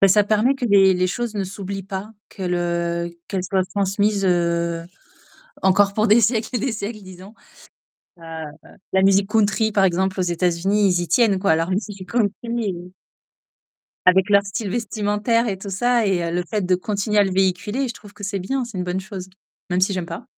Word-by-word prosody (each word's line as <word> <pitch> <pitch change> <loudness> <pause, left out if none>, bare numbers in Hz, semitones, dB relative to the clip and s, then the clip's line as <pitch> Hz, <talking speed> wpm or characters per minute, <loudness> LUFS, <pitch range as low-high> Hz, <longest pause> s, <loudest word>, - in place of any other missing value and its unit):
Bah 195 - +6
ça 205 +2 +5
permet 215 +6 +2
que 260 - -4
les 195 -3 +5
les 180 0 +1
choses 230 +4 -3
ne 200 - -1
s'oublient 195 0 -6
pas. 195 +3 -6 0.2
Que 195 - -10
le 170 -1 -2
qu'elles 190 -2 -3
soient 190 0 0
transmises, 200 +1 0
heu, 170 -1 0 0.8
encore 195 +1 +4
pour 215 +1 +2
des 215 +3 +6
siècles 220 +1 +1
et - - +2
des 255 +2 -1
siècles 215 0 -5
disons. 185 +3 -12 0.9
Heu, 165 - -15 0.7
la 190 - +4
musique 195 +1 +4
country 220 0 +2
par 195 -2 +3
exemple 190 +2 0
aux 185 - +2
États-Unis, 180 +4 +1
ils 175 - +1
y 175 - -4
tiennent, 220 -6 +3
quoi, 195 -3 +2
à - - +5
leur 165 +3 -1
musique 195 -1 -4
country 220 -4 +1
et 200 -7 -3 1.1
avec 190 +2 +4
leur 200 0 +6
style 200 0 -4
vestimentaire 220 +1 0
et 195 - -3
tout 195 +1 -7
ça 240 +3 +1
et 185 -3 +1
heu, 170 0 -2
le 180 - -1
fait 210 -2 -1
de 180 0 +2
continuer 210 +3 -1
à 205 - +6
le 190 - -1
véhiculer. 205 +7 0
Je 235 - -5
trouve 205 -1 -14
que 205 -1 -9
c'est 200 0 -2
bien, 260 +8 -2
c'est 230 -5 -8
une 180 - -2
bonne 180 +1 -2
chose. 190 -1 -8 0.4
Même 180 +1 +1
si 195 +2 +2
j'aime 185 -3 -3
pas. 165 - -7
195 Hz, 205 wpm, -21 LUFS, 185-210 Hz, 1.1 s, Bah